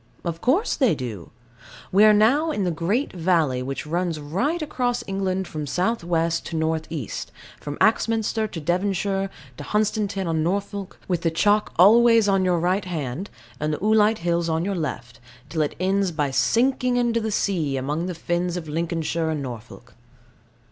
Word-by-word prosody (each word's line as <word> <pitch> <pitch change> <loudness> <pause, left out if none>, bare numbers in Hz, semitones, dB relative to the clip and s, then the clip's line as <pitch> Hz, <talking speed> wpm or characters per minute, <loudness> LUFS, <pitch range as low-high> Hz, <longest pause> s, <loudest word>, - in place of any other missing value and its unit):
Of 170 -1 -3
course 335 - +2
they 255 - +3
do. 115 - -6 0.6
We 200 +3 +5
are 215 - +8
now 240 +10 +4
in 250 -10 -1
the 180 - 0
great 180 - -1
valley 165 -7 +1
which 135 +3 -4
runs 170 0 -1
right 195 - -1
across 250 -6 -1
England 190 -1 -2
from 150 -2 -5
south 185 - 0
west 165 -1 0
to 165 - -5
north 160 0 -1
east, 145 -10 -5 0.3
from 145 0 -6
Axminster 220 0 +1
in 165 -4 -6
Devonshire 195 +3 0 0.3
to 145 - -7
Hunstanton 205 -1 -1
in 160 -1 0
Norfolk, 200 +3 -3
with 175 -3 -1
the 165 - +2
chalk 205 +6 +2
always 230 +4 +6
on 195 -1 +3
your 180 -1 +2
right 185 +4 0
hand, 160 0 -4 0.3
and 150 +1 -1
the 150 - -1
oolite 215 +1 +3
hills 170 -1 +1
on 160 +1 0
your 200 - -1
left, 130 -8 -5 0.3
till 160 - -1
it 150 - -1
ends 190 0 +1
by 145 -4 -1
sinking 245 - +2
into 235 -1 +1
the 220 - -2
sea, 170 -9 0
among 150 +6 -2
the 180 - -4
fens 175 +1 -2
of 165 -3 -6
Lincolnshire 165 +1 -2
and 155 -3 -2
Norfolk. 120 -1 -9
180 Hz, 175 wpm, -23 LUFS, 160-210 Hz, 0.6 s, are